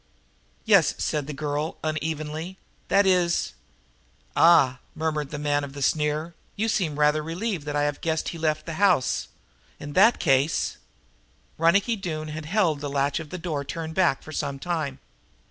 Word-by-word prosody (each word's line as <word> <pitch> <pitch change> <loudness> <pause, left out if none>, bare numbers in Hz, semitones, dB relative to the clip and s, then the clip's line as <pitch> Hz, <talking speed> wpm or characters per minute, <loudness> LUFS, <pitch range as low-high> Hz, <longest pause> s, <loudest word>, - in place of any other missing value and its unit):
"Yes," - - +5
said 150 -2 -2
the - - -4
girl 150 +2 -3
unevenly. 155 +3 -3 0.3
"That 200 0 +4
is 180 -2 +2 0.4
" - - -37 0.2
"Ah!" 150 -7 +5 0.2
murmured 155 -2 -2
the 150 - -5
man 145 0 0
of 140 -1 -7
the 140 -1 -4
sneer. 150 +3 0 0.2
"You 220 +2 0
seem 165 -9 0
rather 150 +1 +3
relieved 170 0 -3
that 145 - -2
I 145 - +2
have 145 0 -2
guessed 160 -1 -1
he 170 - -7
left 155 -1 0
the 165 - -5
house. 185 -10 +3 0.5
In 145 0 -7
that 220 +7 +6
case 135 +4 +1 0.4
" - - -37
Ronicky 200 +8 +3
Doone 155 -5 -4
had 155 0 -6
held 170 -6 +1
the 145 - -3
latch 140 +1 0
of 160 -2 -8
the 185 - -5
door 160 -5 -3
turned 160 +3 -5
back 175 -6 +2
for 155 - -10
some 140 -2 -3
time. 155 -3 -3
155 Hz, 175 wpm, -25 LUFS, 145-170 Hz, 0.5 s, that